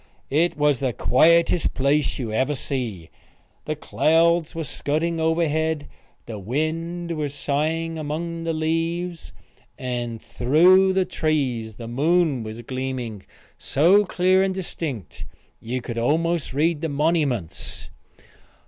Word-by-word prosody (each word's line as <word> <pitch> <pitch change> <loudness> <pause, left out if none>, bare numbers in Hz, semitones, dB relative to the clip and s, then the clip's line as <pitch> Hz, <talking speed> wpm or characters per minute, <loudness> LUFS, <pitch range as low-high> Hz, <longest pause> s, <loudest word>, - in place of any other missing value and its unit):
It 160 +4 +2
was 145 -3 +2
the 130 -3 -1
quietest 170 +7 +3
place 140 +2 +1
you 120 -5 -4
ever 135 +6 +1
see. 120 - -4 0.5
The 155 - -2
clouds 165 +2 +2
was 165 -3 -4
scudding 160 +6 -1
overhead; 160 -2 0 0.4
the 110 -3 -6
wind 165 - -2
was 145 -2 -3
sighing 160 +3 -1
among 165 +3 -4
the 165 - -1
leaves; 165 +2 -2 0.5
and 120 -2 -4
through 180 +12 +4
the 190 -1 +2
trees 130 - -1
the 115 +1 -8
moon 150 +2 +2
was 110 +1 -7
gleaming 130 -5 -5 0.3
so 175 +9 +4
clear 185 0 +2
and 190 -1 0
distinct 140 - -5 0.3
you 125 +3 -4
could 115 -1 -4
almost 165 +5 0
read 155 +3 +1
the 165 - -1
monnyments. 145 - -1
155 Hz, 120 wpm, -23 LUFS, 130-165 Hz, 0.5 s, through